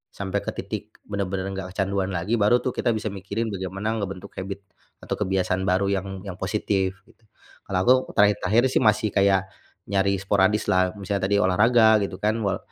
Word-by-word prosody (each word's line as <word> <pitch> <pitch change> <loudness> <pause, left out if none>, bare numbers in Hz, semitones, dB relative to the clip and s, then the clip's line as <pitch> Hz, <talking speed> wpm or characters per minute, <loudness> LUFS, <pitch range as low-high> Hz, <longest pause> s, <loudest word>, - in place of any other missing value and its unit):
sampai 100 0 -2
ke - - -14
titik - - -6
benar-benar 95 -1 -3
nggak 95 -1 -5
kecanduan 100 -1 0
lagi 95 +5 -1
baru 115 +4 +3
tuh 130 - 0
kita 120 -1 0
bisa 110 -1 -3
mikirin 100 +4 -4
bagaimana 95 +4 -3
ngebentuk 95 -2 -6
habit 100 +1 -6 0.4
atau - - -13
kebiasaan 95 0 0
baru 100 +2 +2
yang 100 -1 -1 0.2
yang 95 -2 -7
positif 95 -1 -1
gitu. - - -26 0.5
Kalau 95 -2 0
aku 125 - +6 0.2
terakhir-terakhir 105 +2 +3
sih - - +3
masih 110 0 +3
kayak 95 -1 +3 0.5
nyari 100 0 +2
sporadis 100 +2 +2
lah, 95 0 +2
misalnya 100 -1 -2
tadi 100 - +3
olahraga 110 +3 +5
gitu 100 -1 -3
kan, 110 +3 0
wal 100 -3 0
100 Hz, 175 wpm, -24 LUFS, 95-105 Hz, 0.5 s, aku